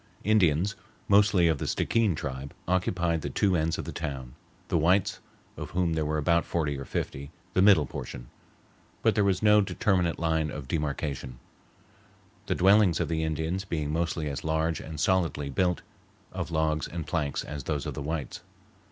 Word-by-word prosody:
Indians, 100 -2 +3 0.3
mostly 100 -3 +5
of 80 -4 +1
the - - -3
Stickeen 110 -7 +1
tribe, 70 -2 -6
occupied 90 -2 +1
the - - -3
two 95 -3 +2
ends 80 0 0
of - - -5
the - - -5
town, 65 -3 -5 0.3
the - - +1
whites, 90 +5 +2 0.4
of - - -6
whom 90 -2 0
there 80 -2 0
were 75 +1 0
about 85 +3 +2
forty 75 -4 -1
or 70 0 -6
fifty, 70 +1 -4 0.2
the 95 - +3
middle 95 -7 +6
portion; - - -7 0.8
but - - +4
there 105 - +2
was 95 0 +1
no 105 0 +6
determinate 95 -4 +1
line 80 -1 0
of 75 -3 -7
demarcation, 70 -3 -3 1.1
the - - +1
dwellings 95 -2 +5
of - - -1
the 80 -1 0
Indians 80 +4 -2
being 75 -6 -3
mostly 80 -1 -1
as 70 -1 -4
large 80 0 0
and 80 -2 -7
solidly 85 -5 +1
built 90 +3 0 0.5
of - - -4
logs 80 -1 0
and 85 -2 -5
planks 75 -4 -1
as 75 -2 -7
those 75 -4 -2
of - - -3
the - - -5
whites. 75 0 -4
80 Hz, 175 wpm, -28 LUFS, 75-90 Hz, 1.1 s, middle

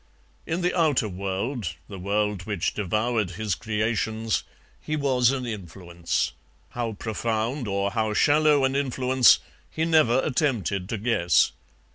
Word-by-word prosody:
In 165 +3 -1
the 180 +1 0
outer 155 -10 +2
world, 100 - -3
the 100 -2 -8
world 100 0 -1
which 100 -4 -1
devoured 110 +1 0
his 110 -3 -1
creations, 110 +1 -1 0.4
he 155 - -3
was 130 -5 +2
an 130 -2 -2
influence; 85 -5 -3 0.4
how 120 -2 -3
profound 115 +4 -2
or 100 0 -1
how 110 -1 -1
shallow 150 0 +4
an 135 0 0
influence 130 -2 +4 0.3
he 160 - -1
never 155 -7 +4
attempted 115 - -1
to 110 - -2
guess. 100 -7 +2
110 Hz, 130 wpm, -25 LUFS, 100-130 Hz, 0.4 s, shallow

